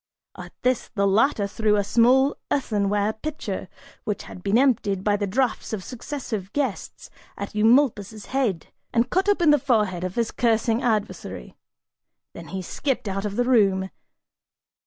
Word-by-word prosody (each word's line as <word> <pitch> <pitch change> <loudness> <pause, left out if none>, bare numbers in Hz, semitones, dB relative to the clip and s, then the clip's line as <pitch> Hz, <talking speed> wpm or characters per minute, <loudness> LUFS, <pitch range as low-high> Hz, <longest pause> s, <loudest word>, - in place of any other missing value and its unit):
At - - -10
this, 255 -1 +1
the 200 -1 +2
latter 210 +2 +3
threw 210 +1 +1
a 205 - +2
small 250 +6 +4
earthenware 205 -5 0
pitcher, 305 +7 -5 0.3
which 210 -2 -3
had 180 - -11
been 200 +4 +2
emptied 210 -8 +2
by 205 0 +2
the 205 0 -2
draughts 240 +3 -1
of 200 -4 -3
successive 240 -6 -6
guests, 270 -8 -3 0.3
at 200 - -6
Eumolpus' 215 -2 +2
head, 240 -11 -2 0.2
and 235 +1 +1
cut 385 +3 +2
open 350 -6 +4
the 295 - +4
forehead 210 -8 +1
of 185 0 -4
his 230 -1 0
cursing 230 0 +1
adversary: 215 -4 -3 0.8
then - - -10
he 190 -1 -5
skipped 265 +4 -2
out 195 +1 -2
of 205 -1 -3
the 245 - +2
room. 195 -6 +3
220 Hz, 155 wpm, -24 LUFS, 200-255 Hz, 0.8 s, small